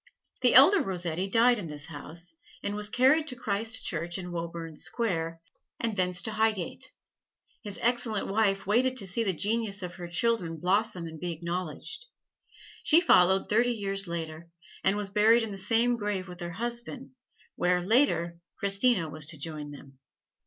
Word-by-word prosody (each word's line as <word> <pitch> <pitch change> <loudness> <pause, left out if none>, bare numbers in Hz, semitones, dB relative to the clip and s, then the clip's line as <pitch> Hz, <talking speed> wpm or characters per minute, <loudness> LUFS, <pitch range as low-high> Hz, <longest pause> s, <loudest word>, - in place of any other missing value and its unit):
The 245 -2 +5
elder 315 +9 +8
Rossetti 180 - -2
died 235 +3 +4
in 180 - -6
this 150 -1 -8
house, 165 +3 -8 0.3
and 200 - -2
was 210 0 -3
carried 270 +7 +3
to 255 - -4
Christ 220 0 -1
Church 170 +1 -2
in 180 -1 -6
Woburn 165 -1 -5
Square, 165 -4 -2 0.4
and 230 -2 -1
thence 180 -1 0
to 220 - -2
Highgate. 215 -4 -1 0.7
His 205 -4 -6
excellent 235 -3 0
wife 195 -1 +1
waited 250 +6 +2
to 205 - 0
see 190 +5 0
the 200 - +1
genius 205 +2 -1
of 180 0 -5
her 175 -2 -6
children 175 -2 0
blossom 190 0 0
and 160 -1 -8
be 175 +1 -3
acknowledged. 175 - -5 0.7
She 320 - +5
followed 190 - +4
thirty 240 +3 +2
years 195 -3 -3
later, 165 -1 -5 0.3
and 195 +2 +2
was 205 -2 -3
buried 220 +3 +5
in 220 - -4
the 195 - -6
same 230 +5 +2
grave 205 -3 -3
with 180 -1 -10
her 175 -1 -5
husband, 240 +5 -5 0.4
where, 180 0 +2
later, 180 -5 +2 0.2
Christina 200 -2 +3
was 155 -1 -2
to 155 - -3
join 150 0 -6
them. 140 -2 -13
195 Hz, 165 wpm, -28 LUFS, 170-230 Hz, 0.7 s, elder